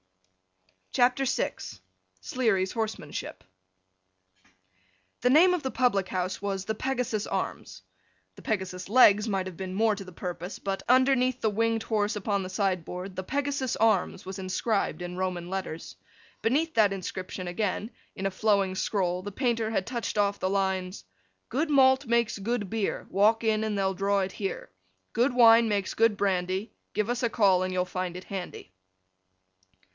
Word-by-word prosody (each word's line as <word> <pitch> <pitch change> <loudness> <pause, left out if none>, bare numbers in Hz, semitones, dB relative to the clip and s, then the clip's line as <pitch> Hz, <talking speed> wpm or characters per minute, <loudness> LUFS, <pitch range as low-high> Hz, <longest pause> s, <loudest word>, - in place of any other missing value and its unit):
CHAPTER 250 +2 +3
VI - - 0 0.7
SLEARY'S 195 - 0
HORSEMANSHIP 220 -2 -4 1.8
THE 250 - +3
name 340 +7 +6
of 355 - -2
the 265 - -1
public 200 -7 +1
house 185 +1 -2
was 195 -1 -3
the 220 - -1
Pegasus's 245 -4 -2
Arms. 95 - -4 0.5
The - - -13
Pegasus's 190 -3 -3
legs 210 -2 +6
might 195 -2 0
have 185 -2 -7
been 185 +1 -5
more 220 +1 +3
to 200 - -7
the 185 - -11
purpose; 180 +2 -6
but, 195 -1 -3
underneath 255 0 +4
the 220 - +1
winged 225 +1 0
horse 210 -2 0
upon 200 -1 -1
the 185 - -6
sign 190 -2 0
board, 180 +3 -7
the 185 - -4
Pegasus's 280 +1 -1
Arms 220 -3 +1
was 190 +1 -6
inscribed 190 +1 -1
in 175 0 -6
Roman 180 -2 -3
letters. 185 -4 -5 0.5
Beneath 305 +8 +1
that 215 -3 +4
inscription 185 -1 -5
again, 205 +4 -2 0.2
in 190 - -5
a 195 - +1
flowing 195 -1 +1
scroll, 180 -2 0
the 205 +2 -6
painter 230 -1 0
had 205 -4 -1
touched 235 -3 -4
off 200 -1 +1
the 185 - 0
lines: 190 -1 -1 0.4
Good 300 +6 -1
malt 265 -1 +4
makes 235 -2 +1
good 210 -1 -2
beer, 220 -3 -2
Walk 215 +4 +3
in, 220 -1 +1
and 215 -2 -1
they'll 195 -1 +1
draw 195 +1 +1
it 190 0 -3
here; 195 -2 -5 0.4
Good 245 +3 +2
wine 230 -2 +7
makes 200 -2 -1
good 225 -2 +3
brandy, 190 +1 -1 0.2
Give 210 0 0
us 245 +1 -1
a 235 - +2
call, 195 -5 +3
and 185 - -2
you'll 180 0 0
find 180 -1 -4
it 180 - -10
handy. 180 - -7
205 Hz, 165 wpm, -28 LUFS, 185-230 Hz, 1.8 s, wine